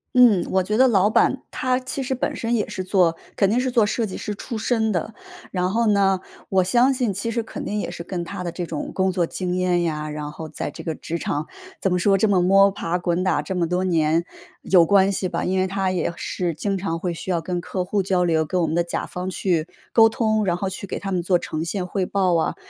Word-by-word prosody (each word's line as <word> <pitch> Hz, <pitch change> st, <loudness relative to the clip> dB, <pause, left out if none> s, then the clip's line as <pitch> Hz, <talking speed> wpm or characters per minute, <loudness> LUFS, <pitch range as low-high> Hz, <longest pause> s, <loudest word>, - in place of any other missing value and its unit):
嗯， 235 Hz, -8 st, +6 dB
我 190 Hz, -, +3 dB
觉 210 Hz, +4 st, -1 dB
得 260 Hz, +1 st, +6 dB
老 205 Hz, -3 st, +4 dB
板 260 Hz, +4 st, +2 dB
他 255 Hz, 0 st, 0 dB
其 260 Hz, +1 st, -4 dB
实 265 Hz, -, -1 dB
本 255 Hz, -, -2 dB
身 230 Hz, +1 st, -2 dB
也 215 Hz, -3 st, 0 dB
是 190 Hz, -3 st, -4 dB
做 180 Hz, -3 st, +2 dB, 0.2 s
肯 195 Hz, -2 st, +3 dB
定 235 Hz, -, +2 dB
是 255 Hz, 0 st, 0 dB
做 240 Hz, -3 st, +4 dB
设 220 Hz, +2 st, 0 dB
计 195 Hz, -, -6 dB
师 210 Hz, -, -4 dB
出 225 Hz, +2 st, -5 dB
身 220 Hz, -1 st, +1 dB
的。 190 Hz, +4 st, -3 dB, 0.4 s
然 180 Hz, 0 st, 0 dB
后 230 Hz, +2 st, +1 dB
呢， 195 Hz, -2 st, +3 dB, 0.3 s
我 190 Hz, -1 st, +3 dB
相 245 Hz, +8 st, +3 dB
信 250 Hz, -5 st, 0 dB
其 200 Hz, +4 st, -2 dB
实 235 Hz, -, 0 dB
肯 225 Hz, -, -7 dB
定 210 Hz, -, -2 dB
也 -, -, -3 dB
是 170 Hz, -, -7 dB
跟 175 Hz, -1 st, -4 dB
他 180 Hz, +1 st, -6 dB
的 170 Hz, -, -3 dB
这 175 Hz, +1 st, -5 dB
种 155 Hz, -3 st, -4 dB
工 190 Hz, 0 st, +1 dB
作 180 Hz, -2 st, +1 dB
经 180 Hz, +1 st, -3 dB
验 180 Hz, -1 st, +1 dB
呀， 155 Hz, -2 st, -2 dB
然 150 Hz, 0 st, -5 dB
后 160 Hz, +1 st, -7 dB
在 155 Hz, -, -5 dB
这 -, -, -9 dB
个 160 Hz, -, -2 dB
职 165 Hz, +2 st, -5 dB
场 150 Hz, -2 st, -3 dB, 0.3 s
怎 190 Hz, -, +1 dB
么 180 Hz, -, +2 dB
说， 195 Hz, +2 st, +3 dB
这 205 Hz, +2 st, +2 dB
么 185 Hz, -3 st, +3 dB
摸 195 Hz, +2 st, +6 dB
爬 180 Hz, -2 st, -2 dB
滚 175 Hz, +1 st, 0 dB
打 185 Hz, -5 st, +1 dB
这 170 Hz, +6 st, -5 dB
么 175 Hz, -2 st, +1 dB
多 180 Hz, +2 st, 0 dB
年 165 Hz, -2 st, +2 dB, 0.4 s
有 180 Hz, -3 st, +5 dB
关 195 Hz, +2 st, +4 dB
系 190 Hz, -1 st, -1 dB
吧。 -, -, -3 dB
因 190 Hz, +1 st, 0 dB
为 185 Hz, -, +2 dB
他 190 Hz, 0 st, -1 dB
也 175 Hz, -2 st, -1 dB
是 175 Hz, -1 st, -3 dB
经 195 Hz, +5 st, -2 dB
常 170 Hz, -3 st, -3 dB
会 180 Hz, -, -2 dB
需 170 Hz, +2 st, -5 dB
要 170 Hz, -, 0 dB
跟 175 Hz, +2 st, -3 dB
客 185 Hz, +1 st, -3 dB
户 195 Hz, +2 st, 0 dB
交 185 Hz, -1 st, +1 dB
流， 160 Hz, -2 st, +2 dB
跟 180 Hz, +3 st, 0 dB
我 165 Hz, -, +1 dB
们 155 Hz, -, -1 dB
的 170 Hz, -, +2 dB
甲 170 Hz, -, -4 dB
方 180 Hz, +1 st, -5 dB
去 175 Hz, -4 st, 0 dB, 0.3 s
沟 225 Hz, -1 st, +7 dB
通， 220 Hz, -1 st, +1 dB
然 175 Hz, -2 st, +1 dB
后 190 Hz, +1 st, -2 dB
去 190 Hz, +1 st, -6 dB
给 -, -, -5 dB
他 195 Hz, -, -5 dB
们 180 Hz, -2 st, 0 dB
做 180 Hz, 0 st, +2 dB
呈 155 Hz, 0 st, -4 dB
现 180 Hz, +1 st, -3 dB
汇 190 Hz, 0 st, -1 dB
报 185 Hz, -2 st, +1 dB
啊。 165 Hz, -, 0 dB
185 Hz, 280 characters per minute, -23 LUFS, 175-205 Hz, 0.4 s, 沟